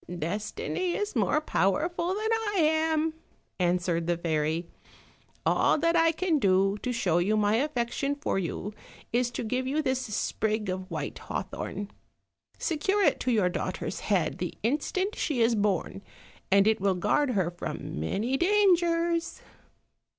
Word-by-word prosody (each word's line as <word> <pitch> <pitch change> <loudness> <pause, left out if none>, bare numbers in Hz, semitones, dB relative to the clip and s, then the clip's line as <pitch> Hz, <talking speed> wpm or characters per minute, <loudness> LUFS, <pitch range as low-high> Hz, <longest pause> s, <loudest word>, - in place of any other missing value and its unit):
"Destiny 215 - -2
is 415 0 -3
more - - +2
powerful 310 - 0
than 435 +2 -1
I 445 -2 -1
am," 315 0 +2 0.5
answered 175 -1 +1
the 175 -1 +1
fairy; 160 0 -1 0.8
"all - - +3
that 335 +2 +2
I 330 -1 +5
can 330 -1 +1
do 195 -1 +3
to 250 - -2
show 175 -8 +1 0.2
my 210 +1 +3
affection 275 0 -1
for 285 -9 -1
you 195 +3 -4 0.4
is 245 0 +2
to 240 - -4
give 255 +3 -1
you 300 +3 0
this 260 -2 +1
sprig 215 -1 -1
of 185 +1 -4
white 160 -4 -4
hawthorn; 205 +1 -5 0.7
secure 385 +5 0
it - - +3
to 255 - 0
your 205 -6 +3
daughter's - - -3
head - - 0
the - - -4
instant 370 - 0
she 290 -6 -1
is 230 +1 +4
born, 205 -2 0 0.5
and 200 0 +5
it 220 -2 +2
will 195 -1 +2
guard 255 +9 +1
her 185 -5 +1
from 175 - -5
many 215 - -1
dangers." 345 -3 +2
240 Hz, 145 wpm, -28 LUFS, 195-325 Hz, 0.8 s, I